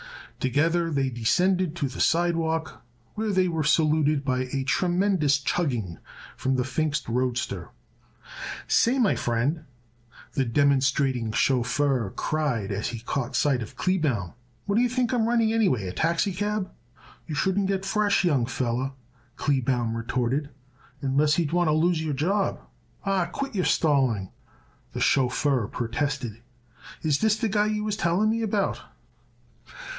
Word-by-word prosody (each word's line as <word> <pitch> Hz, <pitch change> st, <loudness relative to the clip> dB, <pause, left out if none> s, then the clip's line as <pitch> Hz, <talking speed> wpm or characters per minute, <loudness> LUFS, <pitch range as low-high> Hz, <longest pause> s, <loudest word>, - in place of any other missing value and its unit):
Together 165 Hz, +6 st, +1 dB
they 135 Hz, -4 st, 0 dB
descended 175 Hz, -, +1 dB
to 145 Hz, -5 st, -1 dB
the 130 Hz, -, -8 dB
sidewalk 165 Hz, -1 st, 0 dB, 0.3 s
where 215 Hz, 0 st, -2 dB
they 185 Hz, -1 st, +2 dB
were 160 Hz, -3 st, -1 dB
saluted 155 Hz, -2 st, +2 dB
by 130 Hz, -1 st, 0 dB
a 135 Hz, -1 st, -1 dB
tremendous 175 Hz, 0 st, +2 dB
chugging 125 Hz, -, -2 dB, 0.4 s
from 130 Hz, 0 st, 0 dB
the 125 Hz, -, +1 dB
Pfingst 145 Hz, +2 st, -1 dB
roadster. 120 Hz, -7 st, -2 dB, 1.0 s
"Say, 245 Hz, +3 st, +3 dB
my 235 Hz, -6 st, +3 dB
friend," 130 Hz, +7 st, -1 dB, 0.7 s
the 135 Hz, -, +1 dB
demonstrating 135 Hz, -2 st, +2 dB
chauffeur 130 Hz, -1 st, +1 dB
cried 140 Hz, -, -1 dB
as 100 Hz, +2 st, -2 dB
he 115 Hz, -2 st, -5 dB
caught 130 Hz, +2 st, -3 dB
sight 130 Hz, -1 st, +2 dB
of 110 Hz, -, -8 dB
Kleebaum, 145 Hz, -, 0 dB, 0.3 s
"what 200 Hz, +1 st, 0 dB
d'ye 245 Hz, -, +4 dB
think 250 Hz, 0 st, 0 dB
I'm 230 Hz, -2 st, +2 dB
running 230 Hz, -2 st, +2 dB
anyway? 185 Hz, -, +2 dB
A 90 Hz, -, -5 dB
taxicab?" 190 Hz, -, -1 dB, 0.6 s
"You 155 Hz, -, -4 dB
shouldn't 190 Hz, +5 st, +1 dB
get 195 Hz, 0 st, -1 dB
fresh, 205 Hz, 0 st, +2 dB
young 135 Hz, -9 st, +2 dB
feller," 130 Hz, +1 st, -2 dB, 0.4 s
Kleebaum 125 Hz, -5 st, 0 dB
retorted, 125 Hz, +5 st, -1 dB, 0.5 s
"unless 145 Hz, +3 st, +2 dB
you 170 Hz, -, +2 dB
would 145 Hz, -, -4 dB
want 175 Hz, -1 st, +2 dB
to 155 Hz, -, +3 dB
lose 160 Hz, +1 st, +2 dB
your 150 Hz, -3 st, -2 dB
job." 190 Hz, +8 st, 0 dB, 0.5 s
"Aw, 195 Hz, -3 st, +1 dB
quit 270 Hz, +10 st, -5 dB
your 185 Hz, -3 st, 0 dB
stalling," 130 Hz, -, +2 dB, 0.6 s
the -, -, -4 dB
chauffeur 130 Hz, -2 st, +2 dB
protested. 120 Hz, -1 st, -3 dB, 0.6 s
"Is 150 Hz, -3 st, +2 dB
this 220 Hz, -1 st, +3 dB
the 225 Hz, -, 0 dB
guy 210 Hz, +1 st, +2 dB
you 215 Hz, 0 st, -1 dB
was 210 Hz, -1 st, -1 dB
telling 205 Hz, +2 st, +1 dB
me 230 Hz, +1 st, -1 dB
about?" 210 Hz, -2 st, -1 dB
150 Hz, 140 wpm, -26 LUFS, 130-185 Hz, 1.0 s, d'ye